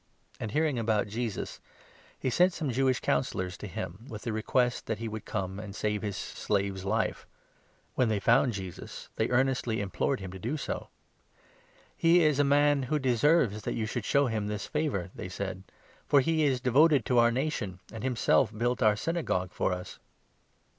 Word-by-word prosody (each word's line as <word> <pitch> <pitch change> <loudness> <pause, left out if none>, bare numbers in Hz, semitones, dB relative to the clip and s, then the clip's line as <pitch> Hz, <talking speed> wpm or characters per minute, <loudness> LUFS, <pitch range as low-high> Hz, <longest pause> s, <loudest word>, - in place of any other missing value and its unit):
And, 110 - -3
hearing 150 +1 +1
about 110 -2 +2
3 100 - -12
Jesus, 115 -2 -3 0.6
he 130 - -1
sent 180 +7 +4
some 155 -6 -2
Jewish 130 +1 +1
Councillors 90 +6 -1
to 105 - -7
him, 95 +5 -6
with 105 -3 -7
the 115 - -2
request 120 +3 0
that 110 - -1
he 115 +1 -4
would 110 -1 -6
come 95 -1 -3
and 105 -1 -8
save 105 -1 -1
his 100 -3 -3
slave's 100 -2 -2
life. 110 +2 -1 0.7
When 125 - +2
4 - - 0
they - - 0
found 120 +3 +4
Jesus, 95 -3 -7
they 110 - +1
earnestly 125 -3 +1
implored 100 +7 -1
him 95 -2 -7
to 95 - -8
do 120 - -2
so. - - -4 0.5
" - - -31 0.3
He 170 +1 +5
is 150 -2 +3
a - - +6
man 145 0 +4
who 155 - +2
deserves 130 -3 +2
that - - -3
you 110 - -1
should 110 0 -3
show 140 0 +3
him 110 -4 -1
this 105 -1 -3
favour," 135 - -2
they - - -7
said, 95 -1 -4 0.2
" - - -29
for 145 - +6
he 160 +2 +2
is 130 -3 +1
devoted 140 +4 +4
to 125 -2 +3
our 120 0 +6
nation, 120 - -2
and 115 - -6
him 130 -1 0
5 - - -7
self 110 - +3
built 120 +1 0
our 105 -1 +5
Synagogue 110 - -1
for - - 0
us." 90 0 -6
115 Hz, 200 wpm, -29 LUFS, 100-135 Hz, 0.7 s, a